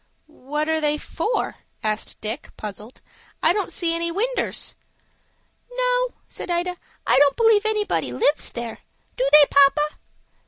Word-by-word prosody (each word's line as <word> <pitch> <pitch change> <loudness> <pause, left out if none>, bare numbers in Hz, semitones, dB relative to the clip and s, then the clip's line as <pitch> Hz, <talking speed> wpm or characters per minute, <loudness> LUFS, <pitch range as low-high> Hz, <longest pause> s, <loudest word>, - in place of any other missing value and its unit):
"What 300 0 -4
are 320 0 +1
they 300 0 +1
for?" 445 +8 -2 0.3
asked 215 0 -2
Dick, 220 +7 -5
puzzled. 210 +3 -8 0.4
"I 330 - +5
don't 400 -1 -1
see 335 -2 -1
any 335 0 -1
winders." 475 +8 -2 1.0
"No," - - 0
said - - -7
Ida, 350 +1 -1 0.3
"I - - +4
don't 285 -1 +4
believe 445 -2 +4
anybody 415 - 0
lives 280 - +1
there. 235 -1 -6 0.4
Do 260 +2 +1
they, 300 0 +9
papa?" 290 +2 +4
310 Hz, 135 wpm, -23 LUFS, 270-410 Hz, 1.0 s, they